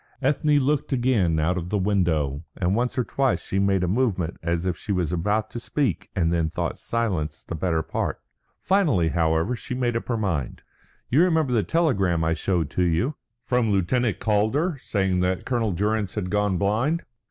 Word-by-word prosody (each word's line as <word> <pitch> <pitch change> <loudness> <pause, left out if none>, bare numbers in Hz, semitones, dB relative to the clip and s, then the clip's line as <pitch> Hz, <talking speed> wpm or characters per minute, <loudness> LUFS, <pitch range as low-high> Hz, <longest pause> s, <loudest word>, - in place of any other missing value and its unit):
Ethne 145 +2 +2
looked 145 +1 +1
again 120 - +2
out 90 +4 +1
of 85 +1 -6
the 105 - 0
window, 85 -8 0
and 90 +1 +1
once 125 +3 -1
or 125 - +2
twice 135 +1 0
she 95 - -1
made 100 -2 +2
a - - +1
movement 95 -5 0
as 85 +1 -1
if 90 - 0
she - - -6
was 90 -3 0
about 105 +5 0
to 120 - -5
speak 125 - -2
and 85 -2 +1
then 85 -2 +1
thought - - -3
silence 100 -10 -2
the - - -7
better 80 -1 0
part. - - -3 0.4
Finally, 150 - +3
however, 80 +6 +1
she 125 - -6
made 120 -2 0
up 115 - -3
her 120 - 0
mind. 85 - -2 0.5
"You 140 +6 +5
remember 160 -7 +2
the 115 - +3
telegram 100 - +1
I 80 0 +2
showed 85 -1 -1
to 90 - +1
you?" 90 - +1 0.3
"From 125 -3 +1
Lieutenant 105 +4 +1
Calder, 125 - +1
saying 95 -3 0
that 90 0 0
Colonel 120 -4 0
Durrance 105 +2 -1
had 90 -4 -3
gone 105 -2 +1
blind?" 115 - +1
100 Hz, 185 wpm, -24 LUFS, 85-125 Hz, 0.5 s, You